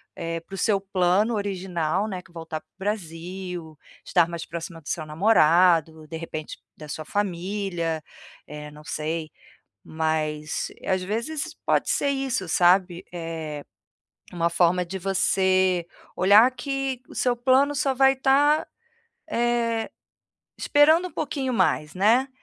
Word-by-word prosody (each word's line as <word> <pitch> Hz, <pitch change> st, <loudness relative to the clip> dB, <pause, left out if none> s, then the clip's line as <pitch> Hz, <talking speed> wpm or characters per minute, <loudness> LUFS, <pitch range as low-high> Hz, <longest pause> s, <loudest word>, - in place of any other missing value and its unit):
eh, 165 Hz, 0 st, -3 dB
para 195 Hz, +4 st, -10 dB
o -, -, -7 dB
seu 200 Hz, -1 st, +1 dB
plano 195 Hz, +3 st, +2 dB
original, 190 Hz, -2 st, -1 dB
né, 190 Hz, -4 st, -4 dB
que 165 Hz, -, -21 dB
é -, -, -24 dB
voltar 165 Hz, -2 st, -6 dB
para -, -, -48 dB
o -, -, -56 dB
Brasil, 180 Hz, -4 st, -5 dB, 0.3 s
estar 175 Hz, -3 st, +3 dB
mais 170 Hz, -1 st, -5 dB
próxima 170 Hz, 0 st, -7 dB
do 150 Hz, -, -10 dB
seu 155 Hz, -, -2 dB
namorado, 160 Hz, -2 st, +3 dB
de 160 Hz, -, -6 dB
repente 155 Hz, -2 st, -6 dB, 0.2 s
da 155 Hz, -, -10 dB
sua 155 Hz, +1 st, -5 dB
família, 180 Hz, -4 st, -2 dB, 0.4 s
eh, 150 Hz, 0 st, -8 dB
não 150 Hz, +1 st, -14 dB
sei. 155 Hz, +1 st, -3 dB, 0.6 s
Mas 155 Hz, -1 st, -2 dB
às 185 Hz, 0 st, +1 dB
vezes 280 Hz, -, -3 dB
pode -, -, +2 dB
ser 285 Hz, -, +1 dB
isso 270 Hz, -8 st, -1 dB
sabe, 180 Hz, +1 st, +3 dB
eh, 160 Hz, -3 st, -5 dB, 0.7 s
uma 170 Hz, -1 st, +1 dB
forma 175 Hz, +1 st, +2 dB
de 190 Hz, +3 st, -6 dB
você 185 Hz, -1 st, +2 dB, 0.3 s
olhar 205 Hz, +6 st, +6 dB
que 270 Hz, -1 st, -3 dB
o -, -, -12 dB
seu 245 Hz, -1 st, +1 dB
plano 265 Hz, +4 st, +3 dB
só 275 Hz, -1 st, +1 dB
vai 270 Hz, +1 st, +5 dB
tá, 285 Hz, +3 st, +3 dB, 0.6 s
eh, 235 Hz, -3 st, 0 dB, 0.7 s
esperando 315 Hz, +5 st, +4 dB
um -, -, -19 dB
pouquinho 265 Hz, -4 st, -2 dB
mais, 150 Hz, -8 st, +1 dB
né, 225 Hz, +8 st, +3 dB
185 Hz, 140 wpm, -25 LUFS, 165-230 Hz, 0.7 s, olhar